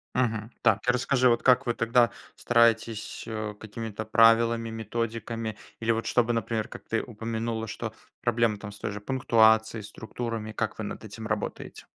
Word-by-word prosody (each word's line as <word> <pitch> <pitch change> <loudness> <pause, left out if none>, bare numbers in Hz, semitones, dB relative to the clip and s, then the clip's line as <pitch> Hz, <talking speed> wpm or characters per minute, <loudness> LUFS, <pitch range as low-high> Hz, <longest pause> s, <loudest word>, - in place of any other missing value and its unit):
Мгм, 115 -3 0
так. 105 -1 +4
Расскажи, 125 +1 +3
вот 120 0 +2
как 125 -2 +5
вы 120 - +1
тогда 115 +1 +3 0.3
стараетесь, 115 -2 +2
э, 110 -1 -4
какими-то 110 0 -6
правилами, 115 +1 +4
методиками 115 0 -4 0.2
или 115 0 +1
вот 115 0 -1
чтобы, 120 -1 +2
например, 115 -1 -1
как - - -10
ты 115 - 0
упомянула, 115 0 -3
что - - -5 0.3
проблемы 115 -2 +2
там 105 +1 -8
с 105 - -12
той - - -3
же 105 - -6
пунктуацией, 110 -2 +3
структурами? 110 +1 -5
Как - - -2
вы - - -4
над - - -6
этим - - -8
работаете? - - -4
115 Hz, 160 wpm, -27 LUFS, 110-115 Hz, 0.3 s, как